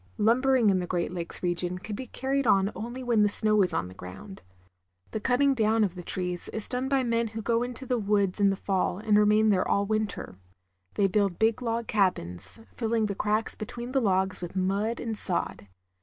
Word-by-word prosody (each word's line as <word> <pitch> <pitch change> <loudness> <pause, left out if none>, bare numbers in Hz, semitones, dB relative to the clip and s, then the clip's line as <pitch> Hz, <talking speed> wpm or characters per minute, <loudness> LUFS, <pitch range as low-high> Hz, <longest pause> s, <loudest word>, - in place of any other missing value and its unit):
Lumbering 240 0 +3
in 185 - +1
the 180 - -3
Great 175 -1 -1
Lakes 175 0 -4
region 175 0 -1
can 210 +3 -6
be 255 +4 -7
carried 270 +1 -1
on 195 0 +3
only 240 +4 -6
when 235 -3 +2
the 205 - +4
snow 215 0 +3
is 185 -2 +4
on 95 - -1
the 90 - -11
ground. 95 - -10 0.7
The 220 - -3
cutting 260 +5 +2
down 220 -2 +2
of 195 -4 0
the 180 - -8
trees 180 0 -3
is 220 -1 -2
done 255 +1 -2
by 270 -1 +2
men 230 -1 0
who 225 +1 -6
go 230 +1 +1
into 245 +1 -5
the 245 -2 0
wgods 200 -2 +1
in 200 -1 +5
the 195 - +1
fall 190 -2 -1
and 210 +1 +1
remain 210 +1 +4
there 190 -3 +2
all 200 - +1
winter. 215 - -3 0.6
They 200 - +2
build 195 -2 +1
big 220 +2 +2
log 230 -1 -2
cab 195 -5 +2
ins, 90 - -6
filling 225 -2 0
the 205 - -2
cracks 215 +3 -1
between 240 +3 -6
the 270 0 +2
logs 190 -3 +1
with 175 +1 -6
mud 200 +5 0
and 225 -2 -3
sod. 175 - -2
210 Hz, 215 wpm, -27 LUFS, 190-230 Hz, 0.7 s, in